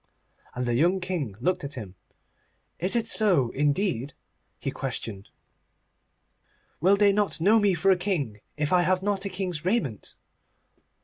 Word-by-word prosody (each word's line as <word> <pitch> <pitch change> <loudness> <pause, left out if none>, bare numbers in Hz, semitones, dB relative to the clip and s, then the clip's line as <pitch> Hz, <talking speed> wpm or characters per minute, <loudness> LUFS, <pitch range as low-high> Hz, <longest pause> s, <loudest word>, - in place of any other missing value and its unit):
And 125 +1 -2
the 120 - 0
young 175 +10 +3
King 175 - -3
looked 180 +7 0
at 140 +2 -6
him. 105 -7 -7 0.9
'Is 185 +6 0
it 230 -1 +1
so, 185 - +3
indeed?' 145 - 0 0.4
he - - -4
questioned. 100 -3 -5 1.5
'Will 190 +5 +4
they 200 -1 +4
not 205 -3 0
know 210 +7 +5
me 200 -3 +3
for 195 +4 +3
a - - +5
king 155 - -2 0.2
if 150 +2 0
I 180 - +5
have 185 +1 +1
not 200 -1 -1
a - - -1
king's 180 -4 -3
raiment? 180 - -2
180 Hz, 150 wpm, -26 LUFS, 140-195 Hz, 1.5 s, know